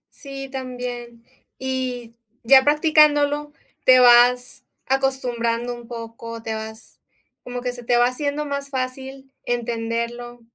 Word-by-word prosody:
Sí, 275 -2 -8
también. 245 -3 -6 0.3
Y, 255 -3 -4 0.3
ya 265 +3 +7
practicándolo 295 -1 +3 0.3
te 255 0 +7
vas 245 0 +5 0.2
acostumbrando 245 -3 -1
un 240 -1 -12
poco, 230 -1 -8
te 225 -1 -4
vas, 220 0 -9 0.4
como 245 0 -5
que 250 0 -3
se 245 -1 -10
te 240 +1 +2
va 240 0 +5
haciendo 285 +4 -2
más 280 -1 -4
fácil 265 +1 -5
entenderlo 240 0 -3
250 Hz, 120 wpm, -22 LUFS, 235-270 Hz, 0.4 s, ya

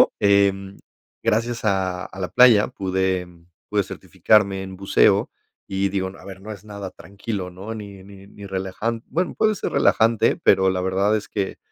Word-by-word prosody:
pero, - - +5
em, 100 -1 +2 0.5
gracias 115 +1 0
a 95 -3 0
a 95 - -11
la 90 - -2
playa 120 -4 +6
pude 95 -4 -1 0.4
pude 105 -1 +2
certificarme 95 +2 +1
en 95 -1 -8
buceo 95 +1 +3 0.4
y 95 0 -1
digo, 95 -1 -2
no, 100 - -14
a - - -15
ver, 95 -1 -9
no 110 +1 -7
es 100 -1 -11
nada 100 -3 -7
tranquilo, 100 -1 -6
¿no?, 95 +5 -8
ni 100 -3 -9
ni 100 -1 -14
ni 100 0 -12
relajan 95 +5 -3
bueno, 180 +3 -2
puede 215 -1 +2
ser - - -4
relajante, 115 0 +3
pero 95 -1 +3
la 90 -1 -1
verdad 95 +3 +1
es 105 - -5
que 100 -2 -3
100 Hz, 180 wpm, -22 LUFS, 95-105 Hz, 0.5 s, playa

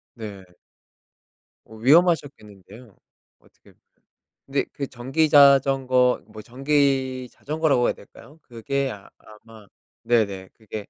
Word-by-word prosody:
네. 100 -4 -9 1.2
오 110 - -15
위험하셨겠는데요. 125 - 0 0.4
어떻게 - - -25 0.7
근데 135 +1 -1
그 140 - -4
전기 135 +6 -1
자전거 135 -3 +4
뭐 110 0 -12
전기 135 -1 -1
자전거라고 150 -5 0
해야 - - +1
될까요? 145 +9 -18
그게 135 +3 -4
아 100 -1 -13
아마 110 0 -17 0.4
네네. 100 -5 0
그게 110 -2 -9
125 Hz, 235 characters per minute, -23 LUFS, 110-140 Hz, 1.2 s, 자전거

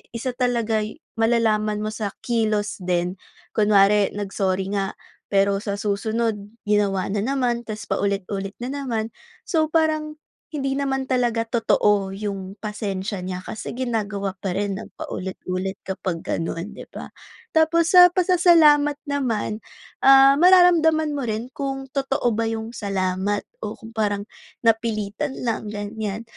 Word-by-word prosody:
isa 250 +2 -2
talaga'y 230 -3 0 0.2
malalaman 215 -2 +2
mo 215 - -2
sa 215 -1 -3 0.2
kilos 215 -3 0
din. 180 0 -1 0.3
Kunwari, 205 -1 +4
nag-sorry 195 -1 -1
nga, 195 -1 -2 0.3
pero 200 0 +2
sa 200 -1 -3
susunod 215 +2 -1 0.2
ginawa 200 -3 +1
na 205 - 0
naman, 240 0 -1
tapos 215 0 -5
paulit-ulit 195 0 -2
na 255 - -3
naman. 235 -6 -3 0.3
So, 315 -2 +1
parang 310 -1 0 0.3
hindi 275 -3 -2
naman 270 -1 0
talaga 240 -3 +1
totoo 210 -4 +1
'yong 195 -2 -5
pasensya 205 -2 -3
niya. 180 0 -5
Kasi 220 - -6
ginagawa 215 -6 -2
pa 185 -2 -3
rin 200 0 -1
ng - - -11
paulit-ulit 185 0 -4
kapag 185 -3 -4
ganoon, 165 +3 -3
di - - -10
ba? - - -9 0.4
Tapos, 320 +1 +3
sa 360 -1 +10
pasasalamat 335 -5 +5
naman, 245 -7 -2 0.4
ah, 270 +1 +7
mararamdaman 335 -3 +5
mo 280 -4 -3
rin 225 +4 -3
kung 270 -1 -4
totoo 270 -3 0
ba 225 +1 0
'yong 225 0 -4
salamat 195 -1 -1 0.2
o 215 0 -5
kung 225 -2 -12
parang 205 -3 -1 0.4
napilitan 225 +3 0
lang, 225 -2 -2
ganyan. 210 +1 -4
220 Hz, 130 wpm, -23 LUFS, 200-270 Hz, 0.4 s, sa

